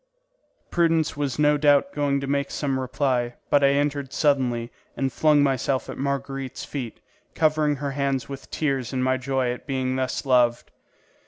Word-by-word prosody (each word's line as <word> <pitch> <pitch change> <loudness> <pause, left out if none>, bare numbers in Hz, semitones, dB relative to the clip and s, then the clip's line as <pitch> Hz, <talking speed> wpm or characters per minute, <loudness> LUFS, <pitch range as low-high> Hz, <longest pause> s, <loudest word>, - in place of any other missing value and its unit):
Prudence 165 -2 +2
was 140 -3 -2
no 150 0 +4
doubt 145 +4 +3
going 140 -1 0
to - - -3
make 140 0 -1
some 135 -3 -2
reply, 125 -2 -1 0.2
but 145 -1 +4
I 140 0 +5
entered 140 -1 -1
suddenly 125 -6 +1 0.3
and 135 -1 -1
flung 150 -2 +4
myself 135 -1 0
at - - -8
Marguerite's 135 -1 -3
feet, 130 -6 -6 0.4
covering 155 -2 +2
her 140 0 -3
hands 135 -1 -1
with 135 -1 -9
tears 135 -5 -2
in 130 -1 0
my 130 0 +2
joy 130 -1 -1
at 125 - -11
being 130 -1 -1
thus 130 +2 -2
loved. 120 -3 +2
140 Hz, 165 wpm, -24 LUFS, 130-145 Hz, 0.4 s, I